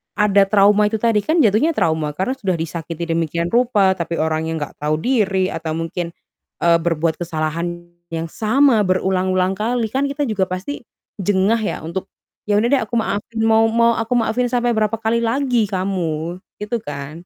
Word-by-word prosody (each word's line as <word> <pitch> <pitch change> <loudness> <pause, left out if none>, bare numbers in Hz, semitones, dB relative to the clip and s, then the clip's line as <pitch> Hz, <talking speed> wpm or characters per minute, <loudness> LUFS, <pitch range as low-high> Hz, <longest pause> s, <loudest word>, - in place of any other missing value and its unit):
ada 200 -1 +4
trauma 205 +1 +4
itu 215 - -2
tadi, 230 -2 +3
kan 320 +1 +3
jatuhnya 230 +8 +3
trauma 160 - 0
karena 190 - -2
sudah 195 -6 -1
disakiti 165 0 -5
demikian 165 +1 -1
rupa, 210 -6 +3
tapi 170 0 -3
orangnya 160 0 -1
nggak - - -21
tahu 150 +1 0
diri 195 -5 +1
atau 160 -1 -4
mungkin, 170 +1 -4 0.5
eee, 170 0 +5
berbuat 165 -1 0
kesalahan 170 +1 -3 0.2
yang 165 0 -3
sama 225 - +3
berulang-ulang 185 0 +1
kali. 225 +1 -1
Kan 270 +3 0
kita 280 +1 -2
juga 195 -3 +1
pasti 190 +10 -5 0.3
jengah 200 +3 +2
ya, 215 - -2
untuk, 170 +4 -5 0.4
"Ya 205 0 +3
udah 235 - +1
deh 280 - +4
aku - - -28
maafin, 215 +2 -3
mau 225 0 +4
mau 230 0 +3
aku 225 +2 -1
maafin 240 +1 +1
sampai 245 -1 +1
berapa 215 +1 +1
kali 225 +1 +1
lagi 240 0 +1
kamu?" 180 -4 -2 0.2
Gitu 210 +3 -2
kan? 145 +4 -7
195 Hz, 170 wpm, -19 LUFS, 170-225 Hz, 0.5 s, eee